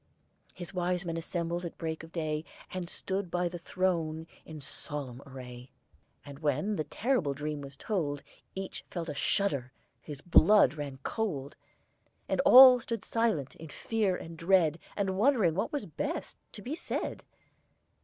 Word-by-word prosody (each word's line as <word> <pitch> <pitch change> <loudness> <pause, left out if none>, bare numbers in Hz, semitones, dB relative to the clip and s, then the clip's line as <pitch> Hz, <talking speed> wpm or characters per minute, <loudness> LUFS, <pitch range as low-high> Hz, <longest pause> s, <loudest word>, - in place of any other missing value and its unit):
His 180 +1 -7
wisemen 180 -1 -1
assembled 170 +1 -2
at 170 - -6
break 160 -1 -3
of 160 0 -12
day, 155 -2 -2 0.3
And 180 -2 -4
stood 190 -1 -3
by 175 +1 0
the 175 0 -6
throne 165 -3 -1 0.2
in 155 -1 -8
solemn 140 -2 -6
array. 125 -1 -9 0.6
And 140 -1 -10
when 150 +8 0
the 155 - -2
terrible 205 - 0
dream 150 +1 -3
was 140 0 -9
told, 145 -9 -2 0.3
Each 190 0 -5
felt 170 -2 -5
a - - -2
shudder, 140 - 0 0.3
his 145 -2 -8
blood 180 -3 +6
ran 145 -3 -5
cold, 155 -11 -2 0.7
And - - +1
all 255 0 +11
stood 230 -3 -4
silent, 220 - 0
in 160 - -9
fear 210 +1 0
and 165 -1 -8
dread, 170 -2 +3 0.2
And 190 -2 0
wondering 220 - +4
what 190 - -1
was 290 - -2
best - - -4 0.2
to 205 - -8
be 260 - -4
said. 330 - -3
170 Hz, 155 wpm, -30 LUFS, 150-195 Hz, 0.7 s, all